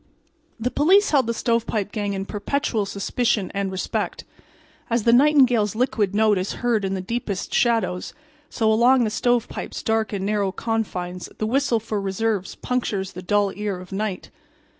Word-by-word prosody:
The 245 +3 -1
police 375 +10 +4
held 275 -6 +3
the 235 - 0
"Stovepipe" 225 -3 0
gang 205 -1 -2
in 195 0 -3
perpetual 215 0 -1
suspicion 205 +1 -1
and 200 -1 -2
respect. 190 - -3 0.7
As 230 -1 +1
the 235 - +4
nightingale's 245 -6 +4
liquid 215 -5 0
note 215 -2 +3
is 185 - -3
heard 230 -4 +2
in 195 0 -1
the 190 - -3
deepest 200 -1 -4
shadows, 225 -6 +1 0.3
so 220 -2 +1
along 245 +3 +5
the 215 - 0
"Stovepipe's" 240 +1 -1
dark 220 -1 0
and 195 -2 -3
narrow 205 -2 0
confines 185 -6 -3
the 215 - -1
whistle 245 0 +1
for 215 -2 -3
reserves 195 0 -2
punctures 205 -6 -2
the 180 - -7
dull 200 +1 +1
ear 205 -3 -3
of 180 +1 -12
night. 195 -1 -3
215 Hz, 160 wpm, -23 LUFS, 195-235 Hz, 0.7 s, along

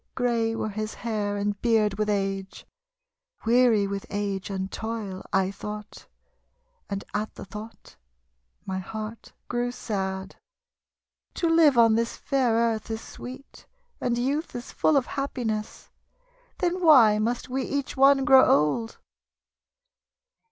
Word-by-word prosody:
Grey 230 -3 +1
were 220 - -2
his 215 +1 -4
hair 210 -3 -2
and 205 0 -2
beard 215 -4 +2
with 215 0 0
age. 195 -1 -2 0.8
Weary 230 -3 +4
with 195 0 -4
age 200 -2 -3
and 190 -1 -3
toil, 220 -4 -5
I 190 0 +2
tho't, 210 +1 -8 0.8
And 200 -1 -3
at 210 +1 -3
the - - -8
tho't 210 +3 -11 0.7
my 190 0 -3
heart 215 +3 -7
grew 245 0 -1
sad. 190 -4 -4 1.0
"To 340 - 0
live 325 -5 +5
on 230 -1 +6
this 230 +1 0
fair 260 -4 +1
earth 230 -1 0
is 220 0 -3
sweet, 260 +3 -11 0.3
And 240 -1 0
youth 280 +7 -1
is 240 +1 -6
full 305 - +2
of 265 - +2
happiness. 235 -6 -4 0.7
Then 360 0 -1
why 235 -10 +7
must 240 +3 -1
wc 265 +1 -1
each 280 0 -3
one 275 0 +5
grow 265 -2 +7
old?" 150 +11 +2
225 Hz, 130 wpm, -26 LUFS, 205-250 Hz, 1.0 s, why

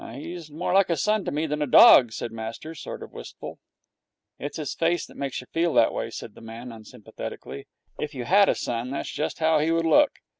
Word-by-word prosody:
'He's 165 +3 -8
more 165 +4 -3
like 195 -1 +4
a 170 - +1
son 210 +7 +1
to - - -2
me 150 +2 -1
than 150 -1 -3
a 150 - 0
dog,' 125 -2 +8
said 115 - -5
master, 115 +8 -7
sort 155 - -8
of - - -12
wistful. - - -9 0.8
'It's 145 +3 -5
his 150 -3 -4
face 170 +1 0
that - - -16
makes 140 -2 -4
you 125 - -16
feel 165 -1 +1
that - - +4
way,' - - -3
said - - -8
the - - -15
man, 115 +2 -9
unsympathetically. 110 -9 -9 0.3
'If 150 -1 -4
you 125 - -4
had 200 +5 +5
a - - +2
son 120 +1 -3
that's 140 - -4
just 150 - -3
how 160 -1 +3
he 155 +2 +1
would 165 0 +1
look. 280 - +4
150 Hz, 225 wpm, -25 LUFS, 125-165 Hz, 0.8 s, dog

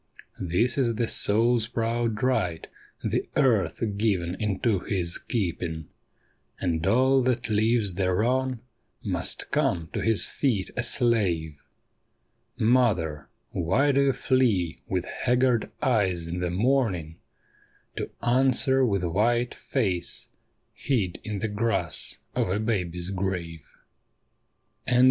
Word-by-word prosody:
This 105 +10 +1
is 120 -4 +1
the 115 +1 0
soul's 115 +2 +3
proud 115 -1 -1
right, 90 -11 0 0.4
the - - -1
earth 120 -7 +2
given 95 -5 0
into 105 0 0
his 90 -2 -1
keeping; 85 - -3 0.7
And 80 -3 -1
all 130 +5 +4
that 125 -2 0
lives 110 -1 +2
thereon 115 +7 0 0.4
must - - 0
come 80 -2 0
to - - -2
his 115 -2 +3
feet 115 -9 -1
a - - 0
slave. 95 - 0 1.0
Mother, 95 - +2 0.2
why 105 - +2
do 140 0 +3
you 135 - +3
flee 110 -13 +1
with 90 -2 -1
haggard 125 -2 +1
eyes 95 -9 +1
in 85 +2 -4
the 90 0 -1
morning 95 - 0 0.8
To - - -3
answer 130 +2 +3
with 100 -6 +1
white 120 +7 +1
face 95 -10 -2 0.4
hid 105 -11 -1
in 105 -1 -4
the 110 - -2
grass 105 -6 -1 0.2
of - - 0
a 95 - 0
baby's 90 -5 -2
grave 90 -5 -4
105 Hz, 115 wpm, -26 LUFS, 90-120 Hz, 1.0 s, all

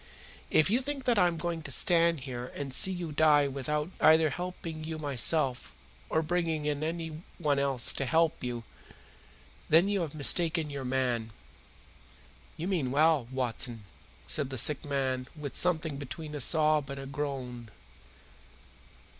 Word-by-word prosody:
If 155 +5 +3
you 240 +4 +2
think 280 0 -4
that 240 -4 +2
I 180 - +5
am 170 -1 -2
going 170 0 -3
to 145 - -9
stand 170 +2 +3
here 125 -1 -6
and 140 -2 -5
see 190 - +3
you 175 -3 -5
die 150 -1 +4
without 150 +4 -2
either 155 -1 +5
helping 165 -1 -6
you 160 0 -5
myself 140 -1 +1 0.4
or 160 - +1
bringing 160 -2 -1
anyone 155 0 -3
else 135 -3 +2
to 135 - -1
help 160 +3 +1
you, 120 -2 -4 1.1
then 165 +5 +5
you 200 -2 0
have 155 -3 -4
mistaken 160 +1 +2
your 140 -2 -5
man." 125 -3 -1 1.3
"You 165 +2 -4
mean 170 -10 -1
well, 150 -2 +2
Watson," 120 -3 -2 0.4
said 145 -4 -1
the 130 - -5
sick 150 +6 +4
man 130 -3 -2
with 150 -3 -7
something 160 -4 +1
between 150 +3 -8
a 145 - -2
sob 155 0 +3
and 140 0 -6
a 135 - -7
groan. 135 -5 -5
150 Hz, 150 wpm, -29 LUFS, 135-165 Hz, 1.3 s, I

